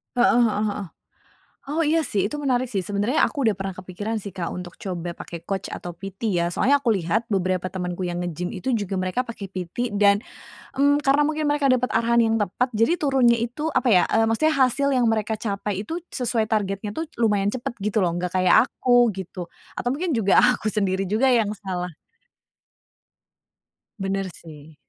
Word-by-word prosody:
Heeh 245 0 +4
heeh 210 0 -1
heeh. 200 -1 -5 0.9
Oh, 320 - -1
iya 320 +2 +3
sih, 205 -7 0
itu 295 - -6
menarik 255 -2 +1
sih, 200 -6 -2
sebenarnya 205 - 0
aku 280 -5 0
udah 215 - +3
pernah 195 0 -4
kepikiran 205 +5 -4
sih, 200 -2 -8
Kak, 175 -3 -3
untuk 180 -1 -7
coba 175 -4 -4
pakai 170 0 -9
coach 195 -1 -3
atau 175 -1 -6
PT 195 +4 -5
ya 170 0 +1
soalnya 280 +9 +3
aku 235 - +2
lihat 195 +4 0
beberapa 185 -1 0
temenku 180 -1 -4
yang 175 -1 -2
nge-gym 175 0 -3
itu 235 +5 -2
juga 200 -3 -2
mereka 185 +7 0
pake 230 -5 -7
PT 195 +5 -4
dan, 200 0 +4 0.6
mmm, 285 +1 +4
karena 285 +1 +4
mungkin 305 -1 0
mereka 290 -1 +1
dapat 250 0 0
arahan 235 +1 +3
yang 225 0 +2
tepat 215 +5 0
jadi 230 +9 +3
turunnya 265 -5 +4
itu, 250 +7 -3
apa 250 - +2
ya, 185 -4 +5
eee, 225 +1 +2
maksudnya 310 +8 +2
hasil 275 +1 +2
yang 245 -3 +3
mereka 220 0 0
capai 200 -2 -3
itu 325 +9 -4 0.2
sesuai 235 -3 0
targetnya 205 -1 -2
tuh 320 +3 -4
lumayan 205 -3 +2
cepet 240 -1 -4
gitu 210 +1 -1
loh, 170 - 0
enggak 180 0 -2
kayak 185 +7 +5
aku 245 -2 +3
gitu. 180 -2 -7 0.3
Atau 245 - -2
mungkin 325 +3 -1
juga 200 -4 +3
aku 245 -3 +3
sendiri 195 -2 0
juga 230 +6 +2
yang 220 -3 +2
salah. 180 -2 -4 2.1
Bener 195 0 -2
sih. 155 -1 -13
210 Hz, 185 wpm, -23 LUFS, 185-245 Hz, 2.1 s, ya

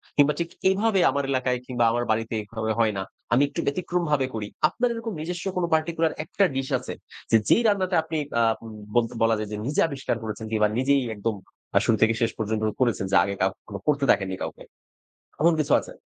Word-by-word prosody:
কিংবা 145 0 +5
ঠিক 170 - -2 0.2
এভাবে 200 +1 +2
আমার 140 0 -1
এলাকায় 130 -1 0
কিংবা 120 -2 +1
আমার 120 +1 0
বাড়িতে 115 +1 -1
এভাবে 110 +1 -3
হয় 110 -2 +3
না, 95 - -2 0.3
আমি 130 +4 +5
একটু 140 - -6
ব্যতিক্রমভাবে 155 -3 0
করি। 105 -2 -3 0.2
আপনার 245 +5 0
এরকম 230 -1 -5
নিজস্ব 175 +3 -4
কোনো 175 -1 +1
particular 160 0 +1
একটা 200 - 0
ডিশ 135 0 -1
আছে? - - -6 0.4
যে 115 - +7
যেই - - +5
রান্নাটা 190 -3 +1
আপনি 160 0 -4 0.2
আ - - +4 0.2
উম 115 - -8 0.2
বল 120 - +4 0.2
বলা 115 0 +4
যায় 105 -1 -4
যে 105 - -3
নিজে 150 - +1
আবিষ্কার 140 -5 -2
করেছেন 110 0 -5
কিংবা 105 -1 +3
নিজেই 140 +2 +3
একদম 105 +1 -2 0.4
আ - - +7
শুরু 110 - +3
থেকে 110 0 +5
শেষ 115 0 +2
পর্যন্ত 110 0 -1 0.2
করেছেন? 120 -5 +1
যে - - +3
আগে 100 +1 -2
কাউকে 95 0 0
কখনো 100 -2 -7
করতে 145 -2 +2
দেখেননি 95 -1 0
কাউকে, - - -7 0.8
এমন 170 +2 +5
কিছু 150 - +2
আছে? - - -10
130 Hz, 205 wpm, -25 LUFS, 110-165 Hz, 0.8 s, যে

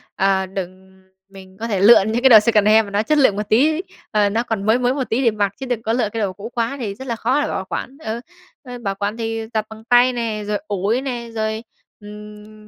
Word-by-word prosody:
ờ, 190 0 +1
đừng 190 0 -8 0.3
mình 190 -1 -14
có 230 - -4
thể 205 -4 -1
lựa 205 +2 +7
những 225 +2 -1
cái 265 - +6
đồ 225 -3 +10
secondhand 215 0 +4
mà 200 - -10
nó 205 +1 +1
chất 305 +7 +1
lượng 260 -8 +4
một 210 0 -4
tí, 305 +9 +3 0.3
ờ, 210 -2 +2
nó 225 +3 0
còn 225 -4 -3
mới 220 +3 +3
mới 250 0 +1
một 265 -2 -3
tí 245 +4 0
để 230 - +4
mặc, 205 -2 -1
chứ 265 - -5
đừng 245 -3 -2
có 225 0 -1
lựa 230 -3 0
cái 225 +1 -4
đồ 195 -3 -1
cũ 205 +4 -8
quá 235 +3 -2
thì 215 -5 -3
rất 265 +5 -10
là 235 - -2
khó 255 +6 0
để 300 - -1
bảo 190 - -3
quản. 270 +3 -5
Ừ, 220 +1 -3 0.4
ừ, 250 -2 -8
bảo 200 -5 -3
quản 205 +2 -3
thì 225 -1 -4
giặt 215 -1 -1
bằng 220 0 -12
tay 245 +2 +4
nè, 225 -3 -3
rồi 210 0 0
ủi 205 +5 -1
nè, 240 -3 -5
rồi, 220 0 -2 0.4
ừm, 210 +1 -12
220 Hz, 255 wpm, -20 LUFS, 205-240 Hz, 0.4 s, đồ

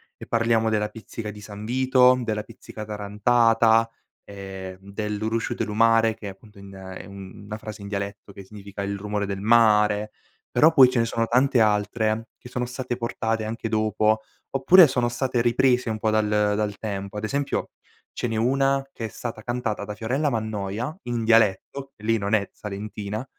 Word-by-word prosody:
E - - -11
parliamo 115 -1 +2
della 105 -1 0
Pizzica 110 -1 -7
di 105 0 -12
San 105 0 -9
Vito, 130 +1 +4
della 105 -2 -2
Pizzica 110 -1 -10
tarantata, 115 +2 +3 0.3
ehm, 95 -2 -8
de 100 +2 -5
Lu 105 +1 -2
Rusciu 115 +1 -2
de - - -2
lu 105 - -5
Mare, 115 0 +4
che 110 -1 -9
è - - -4
appunto 100 +2 -15
in 100 0 -12
è 95 -1 -9
una 100 +2 -9
frase 110 -1 -9
in 100 - -7
dialetto 100 0 -5
che 100 - -10
significa: 100 0 -8
il 100 0 -3
rumore 105 0 -2
del 100 -1 -4
mare. 105 -1 +4 0.4
Però 160 +2 +5
poi 135 -6 +7
ce 125 - +1
ne 115 - +3
sono 115 0 -1
tante 125 +2 +3
altre, 110 +1 +1
che 125 - -13
sono 125 0 -2
state 125 -1 -4
portate 115 -2 -2
anche 115 +1 -4
dopo, 110 0 +1 0.3
oppure 170 +7 +7
sono 125 -3 0
state 125 0 -1
riprese 125 +1 +2
un 110 - -2
po' 110 0 0
dal 110 0 +2
dal 105 -1 +1
tempo; 100 -1 -5
ad 105 - -5
esempio 140 +6 -2 0.4
ce - - -2
n'è 115 - -3
una, 135 +4 +1
che 115 - -6
è - - -2
stata 115 0 -7
cantata 115 -3 -3
da 105 0 -6
Fiorella 130 +8 -1
Mannoia, 110 +2 -3
in 120 -1 -2
dialetto 115 +5 +2
lei 115 +1 +2
non 100 0 -2
è 100 -3 +2
salentina, 105 +2 -6
110 Hz, 185 wpm, -24 LUFS, 105-120 Hz, 0.4 s, poi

